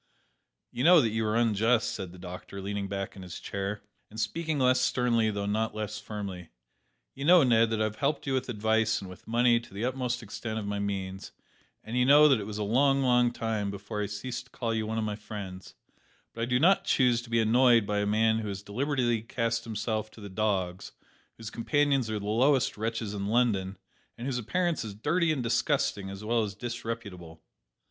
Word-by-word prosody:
"You 125 - -3
know 175 +2 +8
that 115 -6 +2
you 110 +1 -1
are 105 - 0
unjust," 115 +1 +2
said 95 -4 -6
the 90 - -13
doctor, 90 +2 -8
leaning 100 0 -3
back 100 0 -4
in 95 - -10
his 90 -2 -8
chair, 100 +1 -4 0.3
and 110 - -9
speaking 160 +8 -1
less 130 -1 +3
sternly 120 -3 +2
though 100 -1 -3
not 110 +1 -1
less 110 0 -4
firmly; 95 -5 -7 0.6
"you 135 - -7
know, 175 +1 +7
Ned, 115 -3 +4
that 110 -1 -1
I - - +3
have 110 0 -2
helped 140 +2 -1
you 135 - -1
with 130 -1 -1
advice 110 0 +1
and 95 - -8
with 90 +1 -13
money 120 +1 +3
to 115 - -15
the 105 +4 -2
utmost 125 -1 -2
extent 110 +1 -5
of 110 - -3
my 100 0 -2
means, 95 -1 -4 0.5
and 110 +3 -6
you 125 - +3
know 145 +3 +7
that 135 -5 +4
it 100 - -5
was 105 -1 -5
a 105 - -1
long, 135 +6 +3
long 125 -1 +4
time 110 -4 -2
before 105 +2 -5
I 105 - -1
ceased 120 +4 -5
to - - -23
call 115 -2 -2
you 110 -1 -1
one 110 +1 -2
of 110 - 0
my 105 -1 -2
friends; 100 -3 -8 0.6
but 115 - -6
I - - +1
do 125 +1 +1
not 185 +7 +4
choose 125 -3 +3
to 120 - -13
be 115 0 +2
annoyed 115 0 +4
by 105 0 -1
a 105 - 0
man 110 +1 +2
who 110 - -4
has 100 0 -5
deliberately 120 +1 0
cast 115 0 -2
himself 110 -1 -3
to - - -14
the 100 -1 -8
dogs, 95 -3 -2 0.4
whose 115 -2 -8
companions 140 0 +1
are 110 - -1
the 100 - -6
lowest 130 +5 +2
wretches 110 -1 -3
in 100 -1 -3
London, 105 -5 +1 0.4
and 120 - -6
whose 130 -2 -1
appearance 170 +5 -1
is 105 -3 -7
dirty 160 - +1
and 140 -5 -1
disgusting 115 -4 0
as 100 +1 -8
well 115 +1 +2
as 100 -2 -3
disreputable." 100 -8 -6
110 Hz, 215 wpm, -28 LUFS, 105-125 Hz, 0.6 s, know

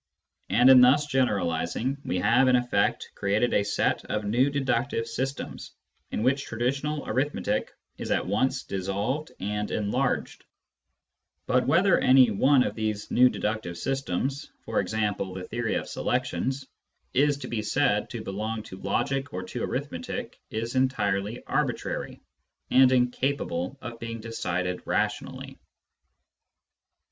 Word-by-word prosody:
And 125 +4 +6
in 130 -1 +9
thus 135 +4 +6
generalising 120 - 0
we - - -1
have, 120 +8 +4
in 130 - +5
effect, 120 -4 +1
created 105 +5 +1
a 100 - +3
set 105 - 0
of 105 -1 -2
new 120 +7 +3
deductive 135 -4 0
systems, 130 +4 -5 0.4
in - - -2
which 135 +2 +2
traditional 135 +6 -2
arithmetic 130 -6 -1 0.3
is - - -5
at - - +1
once 130 +8 0
dissolved 100 - -2
and 105 +1 -2
enlarged; 105 -1 -1 1.0
but 125 0 +2
whether 175 +7 +4
any 130 -3 +6
one 130 +6 +4
of - - -2
these 110 -1 -3
new 125 +1 +6
deductive 105 -7 -3
systems 135 +5 -2
— - - -44
for - - 0
example, 105 -4 -1
the 95 - -5
theory 115 +3 -2
of - - -2
selections 135 +1 -2 0.3
— - - -46
is 145 -1 +2
to 140 - -7
be 115 -2 -2
said 105 - +1
to - - -6
belong 110 +3 -3
to 95 - -10
logic 135 0 -1
or 95 - -4
to - - -6
arithmetic - - -4
is 115 +2 -3
entirely 110 -5 0
arbitrary, - - -2 0.5
and 130 0 +6
incapable 125 -5 0
of 120 -1 -7
being 115 0 -5
decided 90 -5 -3
rationally. - - -2
120 Hz, 135 wpm, -27 LUFS, 105-130 Hz, 1.0 s, in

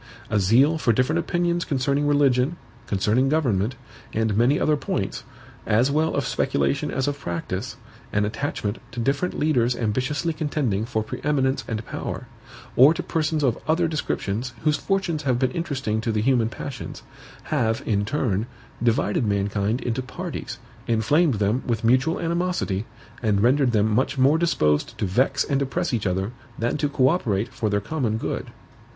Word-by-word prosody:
A 105 - +3
zeal 130 - +4
for 120 - +3
different 130 +8 +1
opinions 175 0 0
concerning 140 0 0
religion, 145 +1 +3 0.3
concerning 105 +7 +2
government, 125 -7 +1 0.4
and 110 -2 +1
many 120 +6 +3
other 155 - +3
points, 145 - -3 0.4
as 115 +5 +3
well 155 +2 +1
of 140 - 0
speculation 140 +2 0
as 130 0 -1
of 145 0 -2
practice; 95 +3 -4 0.3
an 105 0 +1
attachment 110 -2 -3
to 120 - -5
different 140 +8 0
leaders 125 -6 +2
ambitiously 130 +9 -1
contending 145 -9 -1
for 110 -3 -1
pre - - -7
eminence 135 -2 +1
and 110 -1 -3
power; - - -5 0.5
or 140 +6 +7
to - - -3
persons 155 -1 0
of 125 -4 +1
other 165 +2 +2
descriptions 125 -6 -2
whose 150 -1 +3
fortunes 190 -3 -1
have 130 -4 +1
been 130 0 +1
interesting 135 -10 -2
to 115 - -1
the 105 -1 0
human 120 -3 +3
passions, 130 +4 -7 0.5
have, 115 -6 +1
in 100 -2 +1
turn, 115 -3 -1 0.3
divided 115 -2 +1
mankind 100 +3 0
into 120 +1 -1
parties, 130 - -6 0.3
inflamed 125 +6 +3
them 105 +5 +1
with 115 -2 -1
mutual 130 +8 +3
animosity, 170 - -1 0.4
and 105 -4 +2
rendered 130 +2 +3
them 110 -1 +2
much 130 +5 +1
more 140 +5 +4
disposed 75 - +1
to - - -1
vex 110 +9 +2
and 140 -1 0
oppress 130 -1 -1
each 110 -4 0
other 95 +3 -1 0.3
than 120 +5 0
to 150 -1 0
co 130 -2 +3
operate 115 - 0
for 110 - -1
their 100 0 +1
common 115 -1 -1
good. - - -3
130 Hz, 165 wpm, -24 LUFS, 110-145 Hz, 0.5 s, or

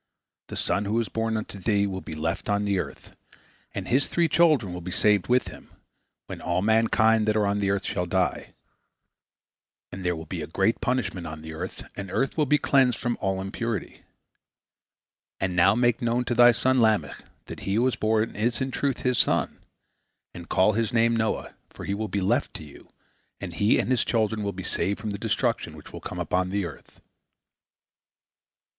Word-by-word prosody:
This - - -3
son 100 - 0
who 110 +3 0
is 115 - -2
born 115 0 -1
unto 105 -2 -6
thee 100 0 +1
will 95 -2 -4
be 80 - -7
left 80 +7 -3
on 100 0 +1
the 100 -2 +1
earth, - - -7 0.6
and - - -5
his 135 +3 +2
three 170 -1 +2
children 155 - +3
will 90 - -6
be 90 - -6
saved 105 +1 +2
with 125 +1 +2
him, - - -13 0.6
when - - -8
all 90 +2 0
mankind 110 0 +3
that 110 - +2
are 105 -1 +2
on 100 0 0
the 100 -1 0
earth 100 -1 0
shall 90 -3 -2
die. 95 0 -1 1.4
And 95 - -7
there 90 -1 0
will 80 0 -7
be - - -5
a - - -5
great 115 - 0
punishment 105 -9 -1
on 80 0 -8
the 80 0 -7
earth, 90 +4 -6
and 100 -1 -6
the - - -9
earth 135 - 0
will 150 -3 +1
be 150 - +4
cleansed 130 -5 +3
from 120 0 -1
all 95 0 0
impurity. 100 +2 -4 1.4
And 95 -1 -1
now 95 +3 +5
make 120 -1 +2
known 120 +1 0
to 120 - -1
thy 120 0 +7
son 130 +2 +2
Lamech 110 -2 +1 0.2
that - - -8
he 95 - -2
who 115 - +3
was 130 -1 +2
born 110 +1 0
is 115 +3 0
in 130 0 -2
truth 135 -1 -1
his 125 -1 +1
son, - - +1 0.7
and 85 0 -10
call 100 +3 +3
his 115 +2 0
name 115 -1 +3
Noah, 110 -1 -1 0.2
for - - -9
he 100 - -1
will 110 +2 -2
be 100 -1 -2
left 120 +9 0
to - - -7
you, 75 - -14 0.5
and - - -6
he 105 +2 +3
and - - 0
his 130 - +3
children 110 -2 0
will 100 -1 -1
be 95 -1 -7
saved 100 +2 0
from 110 0 -4
the 100 - -5
destruction - - -1
which - - -13
will - - -8
come - - -7
upon 90 0 0
the 100 0 -1
earth." 85 - -11
105 Hz, 205 wpm, -26 LUFS, 95-120 Hz, 1.4 s, thy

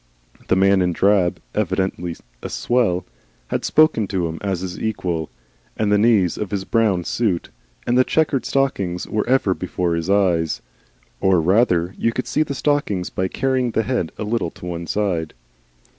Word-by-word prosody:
The - - +3
man 95 0 +4
in 90 -1 +1
drab 95 -1 +2
evidently 95 -3 -1 0.3
a - - -5
swell 115 -8 0 0.4
had - - -1
spoken 155 -9 +3
to 90 -4 -1
him 80 0 -6
as 95 -3 -2
his 90 -1 -5
equal, 90 -7 -2 0.5
and 105 -2 +1
the 105 - +4
knees 105 -6 +3
of 105 - -3
his 95 -1 -3
brown 105 -6 +2
suit 100 -3 -1 0.3
and 120 - +1
the 130 - +6
chequered 145 -2 +1
stockings 100 -10 -1
were 110 +2 -2
ever 130 -7 +3
before 90 -1 -2
his 85 +2 -2
eyes. 90 -5 +2 0.6
(Or, 95 -2 +3
rather, 90 0 +2
you 115 - +2
could 125 - -2
see - - 0
the 145 -2 -1
stockings 135 -11 0
by 95 - -1
carrying 130 +4 0
the 110 0 0
head 110 -8 -1
a - - -3
little 105 -4 -1
to 85 - -12
one 85 -1 -5
side.) 90 -7 -1
95 Hz, 175 wpm, -21 LUFS, 90-115 Hz, 0.6 s, the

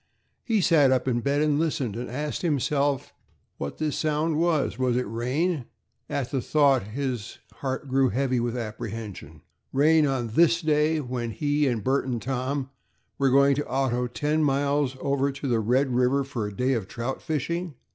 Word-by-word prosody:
He 220 -4 +1
sat 150 -6 +5
up 130 0 +1
in 120 -2 +1
bed 140 +4 +1
and 150 -1 +2
listened, 140 -9 -1
and 120 +2 -5
asked 145 +4 -3
himself 145 -3 0 0.5
what 70 - -4
that 155 -1 -1
sound 155 +1 0
was. 160 -8 +1
Was 125 -2 +1
it 125 - +1
rain? 130 - -1 0.4
At 135 -3 -2
the 135 -3 0
thought 140 -2 +3
his 120 +1 -4 0.2
heart 135 +1 -3
grew 135 0 +3
heavy 130 -1 0
with 120 +1 -2
apprehension. 110 -2 -6 0.3
Rain 150 +2 +4
on 125 -4 -1
this 165 +7 +4
day, 155 0 +2
when 125 -3 -3
he 145 +4 0
and 115 -5 -1
Bert 135 +2 +1
and 120 -2 -1
Tom 135 +3 -3 0.5
were 135 -1 +3
going 140 +2 +5
to 145 +2 -2
auto 125 -2 0
ten 150 +5 0
miles 140 -1 +1
over 140 0 0
to 140 +1 -5
the 120 -3 +2
Red 125 +4 +1
River 125 +3 +2
for 120 -6 -4
a 105 - -9
day 130 +1 +2
of 110 -6 -2
trout 120 +6 -4
fishing. 160 +2 -3
135 Hz, 175 wpm, -26 LUFS, 125-150 Hz, 0.5 s, sat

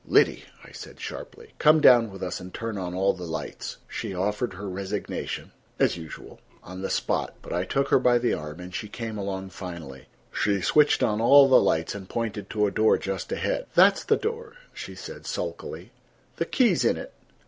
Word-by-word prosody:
"Liddy," - - +3 0.2
I - - -14
said - - -11
sharply, 460 -1 -8
"come 155 +1 +6
down 120 -6 +7
with 95 -1 -8
us 90 - -3
and 90 0 -9
turn 115 +1 -4
on 90 -2 -4
all 95 +1 +2
the 90 -2 -7
lights." 80 - -5
She 95 - -5
offered 105 +3 -1
her 100 +2 -6
resignation, 100 +2 -4 0.3
as - - +2
usual, 80 -2 -10 0.2
on 90 +1 -8
the 95 - -3
spot, - - -1
but - - -6
I 90 +2 0
took 135 +7 0
her - - +5
by 125 -1 +4
the 120 0 +1
arm, 75 +2 -5
and 90 0 -9
she 105 - -4
came 115 +1 -6
along 95 -1 -4
finally. 85 -9 -8 0.3
She 100 -1 +1
switched 150 - +4
on 105 -1 +1
all 140 +4 +8
the 130 - +6
lights 80 0 +1
and 95 -2 -8
pointed 110 -4 -3
to 105 -1 +1
a 100 - 0
door 110 +2 +4
just 95 -2 -4
ahead. - - -1
"That's 195 +3 +6
the 440 - +3
door," 455 0 -4 0.2
she - - -8
said - - -9
sulkily. - - -5 0.5
"The - - 0
key's 250 -3 +2
in - - +2
it." - - -8
100 Hz, 200 wpm, -26 LUFS, 90-120 Hz, 0.5 s, all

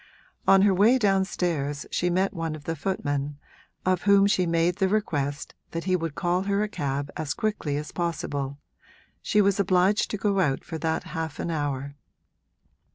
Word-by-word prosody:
On 195 0 +7
her 200 -1 +5
way 215 +7 +5
downstairs 180 - 0
she 180 - +1
met 185 +2 +1
one 165 -3 -3
of 150 - -11
the 165 +2 -3
footmen, 145 -4 -2 0.5
of 185 -1 +2
whom 200 -1 +5
she 185 -3 +2
made 170 +2 +1
the 190 - +2
request 145 -9 -1 0.2
that 165 0 -3
he 185 0 +1
would 165 -4 -3
call 175 0 +1
her 200 +1 0
a - - -1
cab 140 -7 -3
as 155 -3 -3
quickly 205 -9 -1
as 150 0 -5
possible 145 -5 -3 0.6
she 210 - +3
was 200 0 +2
obliged 190 +1 +3
to 210 - -2
go 200 0 +1
out 140 -7 +1
for 160 -1 -6
half 160 -1 -2
an 170 - -2
hour. 140 -2 -3
175 Hz, 170 wpm, -26 LUFS, 145-195 Hz, 0.6 s, On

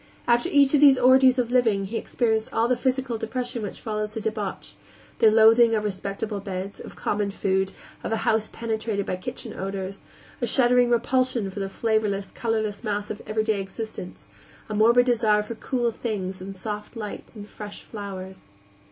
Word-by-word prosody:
After 240 0 +3
each 280 -1 +4
of 295 - +4
these 275 -3 +8
orgies 260 +1 +6
of 245 -1 0
living 225 -6 +3
he 210 +4 -6
experienced 220 -2 0
all 230 +1 +2
the 250 - +2
physical 255 -2 -1
depression 245 +2 -3
which 205 - -5
follows 215 0 -3
a - - -1
debauch; 215 -2 -4 0.5
the 225 - +7
loathing 225 +1 +6
of 210 - 0
respectable 200 +1 -3
beds, 195 0 -5
of - - -10
common 205 -1 -1
food, 190 -1 0 0.3
of - - -3
a 225 - +1
house 220 -1 +2
penetrated 220 -3 -2
by - - -2
kitchen 185 - -6
odors; 195 0 -5 0.4
a 240 - +1
shuddering 245 0 +4
repulsion 240 -3 +1
for 200 - -7
the 195 -1 -2
flavorless, 210 -2 0
colorless 220 -2 -2
mass 205 -1 -2
of 210 - -6
everyday 215 -1 0
existence; 195 -1 -7 0.4
a - - -3
morbid 235 +3 +5
desire 220 -4 +3
for 210 - -6
cool 240 +1 -1
things 195 -5 -4
and 195 +1 -7
soft 210 +3 -6
lights 215 +1 -7
and 205 -1 -9
fresh 210 -1 -9
flowers. 190 - -8
220 Hz, 175 wpm, -25 LUFS, 200-240 Hz, 0.5 s, these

